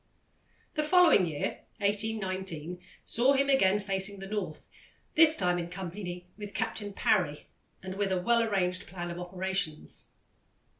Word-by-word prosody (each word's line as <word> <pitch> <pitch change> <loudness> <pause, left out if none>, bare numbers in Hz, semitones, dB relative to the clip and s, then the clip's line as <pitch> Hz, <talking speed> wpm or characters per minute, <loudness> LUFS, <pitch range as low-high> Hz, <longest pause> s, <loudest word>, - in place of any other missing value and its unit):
The 305 - 0
following 325 - +6
year, 150 -3 -3 0.2
1819, 190 -5 -2 0.3
saw 255 +4 +3
him 275 0 +2
again 205 -8 +4
facing 195 0 0
the 195 - -7
North, 195 -6 -4 0.5
this 320 0 +7
time 180 -1 +1
in 170 0 -4
company 180 0 -6
with 205 -2 -7
Captain 210 -1 -2
Parry, 180 -7 +1 0.4
and 185 0 -5
with 195 0 -1
a 185 - +2
well 235 +5 +3
arranged 185 -5 0
plan 175 -1 -5
of 170 - -6
operations. 180 -3 -3
190 Hz, 140 wpm, -30 LUFS, 180-215 Hz, 0.5 s, this